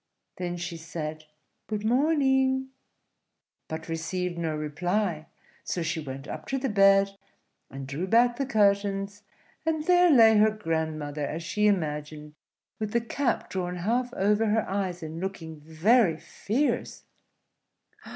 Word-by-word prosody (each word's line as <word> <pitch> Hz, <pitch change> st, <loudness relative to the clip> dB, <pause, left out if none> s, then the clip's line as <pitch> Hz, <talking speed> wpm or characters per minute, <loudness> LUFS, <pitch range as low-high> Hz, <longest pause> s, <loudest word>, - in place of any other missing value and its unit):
Then 175 Hz, -1 st, -3 dB
she 175 Hz, -1 st, -5 dB
said, 155 Hz, -1 st, -6 dB, 0.4 s
"Good 215 Hz, -1 st, -3 dB
morning," 265 Hz, 0 st, +2 dB, 1.0 s
but 160 Hz, +1 st, -6 dB
received 175 Hz, +2 st, -3 dB
no 165 Hz, -2 st, -2 dB
reply; 160 Hz, +3 st, -2 dB, 0.4 s
so 175 Hz, -, -2 dB
she 165 Hz, 0 st, -2 dB
went 135 Hz, -1 st, -7 dB
up -, -, -7 dB
to 270 Hz, -, -1 dB
the 265 Hz, 0 st, -1 dB
bed, 195 Hz, -1 st, +5 dB, 0.6 s
and 135 Hz, 0 st, -7 dB
drew 145 Hz, +7 st, -4 dB
back 240 Hz, +3 st, +4 dB
the 275 Hz, -, -2 dB
curtains, 200 Hz, -2 st, +1 dB, 0.4 s
and 315 Hz, -1 st, -1 dB
there 360 Hz, 0 st, +5 dB
lay 225 Hz, -7 st, +7 dB
her 215 Hz, +1 st, +6 dB
grandmother 160 Hz, -7 st, -3 dB
as 160 Hz, +3 st, -5 dB
she 210 Hz, +5 st, +1 dB
imagined, 150 Hz, -5 st, -2 dB, 0.5 s
with 215 Hz, -1 st, -3 dB
the 235 Hz, -, +3 dB
cap 240 Hz, +2 st, -1 dB
drawn 180 Hz, -1 st, -3 dB
half 235 Hz, +7 st, -1 dB
over 210 Hz, +3 st, +2 dB
her 215 Hz, +1 st, +1 dB
eyes 185 Hz, -3 st, -2 dB
and 160 Hz, +1 st, -6 dB
looking 165 Hz, -5 st, -6 dB
very 165 Hz, +5 st, +3 dB
fierce. 250 Hz, -, -2 dB
190 Hz, 135 wpm, -27 LUFS, 160-225 Hz, 1.0 s, lay